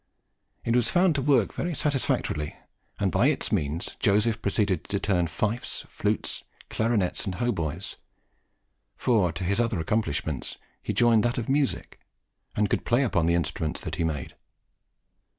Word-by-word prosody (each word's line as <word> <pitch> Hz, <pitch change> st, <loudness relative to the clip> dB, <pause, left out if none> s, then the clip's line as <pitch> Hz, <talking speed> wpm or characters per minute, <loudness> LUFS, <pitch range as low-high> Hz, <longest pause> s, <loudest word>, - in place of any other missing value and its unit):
It 115 Hz, -, +2 dB
was 120 Hz, -2 st, +3 dB
found 180 Hz, -1 st, +4 dB
to 140 Hz, -, 0 dB
work 130 Hz, -6 st, +3 dB
very 175 Hz, -2 st, -2 dB
satisfactorily, 130 Hz, -, 0 dB, 0.4 s
and -, -, +1 dB
by -, -, +4 dB
its -, -, 0 dB
means 75 Hz, +4 st, -1 dB
Joseph 105 Hz, +2 st, +2 dB
proceeded 100 Hz, -2 st, 0 dB
to 100 Hz, -, -1 dB
turn 90 Hz, -5 st, +1 dB
fifes, 110 Hz, +8 st, -2 dB
flutes, -, -, -2 dB, 0.3 s
clarinets, 110 Hz, -5 st, +1 dB
and 95 Hz, -, -3 dB
hautboys; 90 Hz, -7 st, -2 dB, 1.0 s
for 105 Hz, -8 st, +2 dB
to 90 Hz, +4 st, -5 dB
his 100 Hz, +4 st, +1 dB
other 115 Hz, -5 st, +1 dB
accomplishments 80 Hz, -, -1 dB, 0.2 s
he -, -, -3 dB
joined 115 Hz, -2 st, +4 dB
that 120 Hz, +3 st, 0 dB
of 115 Hz, -, -2 dB
music, 140 Hz, 0 st, 0 dB, 0.6 s
and 105 Hz, 0 st, +2 dB
could -, -, 0 dB
play 120 Hz, +4 st, +3 dB
upon 90 Hz, -10 st, +1 dB
the 85 Hz, -, +3 dB
instruments 80 Hz, -2 st, -1 dB
that 80 Hz, 0 st, -4 dB
he 85 Hz, -, 0 dB
made. 75 Hz, -4 st, -2 dB
105 Hz, 150 wpm, -27 LUFS, 85-120 Hz, 1.0 s, found